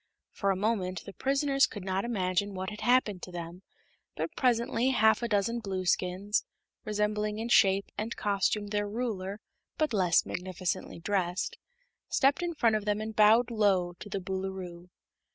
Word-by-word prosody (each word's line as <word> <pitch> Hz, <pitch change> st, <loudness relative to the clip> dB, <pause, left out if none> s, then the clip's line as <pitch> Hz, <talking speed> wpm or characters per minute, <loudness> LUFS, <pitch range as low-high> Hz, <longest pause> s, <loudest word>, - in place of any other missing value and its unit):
For 200 Hz, -, -1 dB
a 195 Hz, -, +3 dB
moment 190 Hz, -3 st, -1 dB
the 200 Hz, -, -9 dB
prisoners 275 Hz, +1 st, +2 dB
could 205 Hz, -, -8 dB
not 190 Hz, 0 st, -1 dB
imagine 200 Hz, -3 st, -1 dB
what 190 Hz, +2 st, -4 dB
had 210 Hz, -, -8 dB
happened 240 Hz, -7 st, +2 dB
to 180 Hz, -, -8 dB
them, 175 Hz, +1 st, -7 dB, 0.5 s
but 330 Hz, -, -4 dB
presently 240 Hz, 0 st, +2 dB
half 220 Hz, -4 st, +4 dB
a 235 Hz, -, -1 dB
dozen 230 Hz, +2 st, 0 dB
Blueskins, 190 Hz, 0 st, 0 dB, 0.4 s
resembling 210 Hz, -1 st, -1 dB
in 225 Hz, +2 st, -4 dB
shape 195 Hz, -3 st, +5 dB
and 220 Hz, +2 st, -3 dB
costume 205 Hz, +1 st, 0 dB
their 205 Hz, 0 st, -1 dB
ruler 205 Hz, -3 st, -3 dB, 0.4 s
but 305 Hz, -5 st, 0 dB
less 180 Hz, -4 st, +3 dB
magnificently 185 Hz, 0 st, -4 dB
dressed, 180 Hz, 0 st, -1 dB, 0.5 s
stepped 275 Hz, +4 st, +3 dB
in 345 Hz, -1 st, -2 dB
front 230 Hz, -7 st, +3 dB
of 210 Hz, -1 st, -2 dB
them 210 Hz, 0 st, 0 dB
and 215 Hz, 0 st, -5 dB
bowed 220 Hz, +3 st, +5 dB
low 195 Hz, -5 st, +2 dB
to 205 Hz, -, -9 dB
the 195 Hz, -, -2 dB
Boolooroo. 185 Hz, -2 st, -5 dB
205 Hz, 160 wpm, -29 LUFS, 185-225 Hz, 0.5 s, shape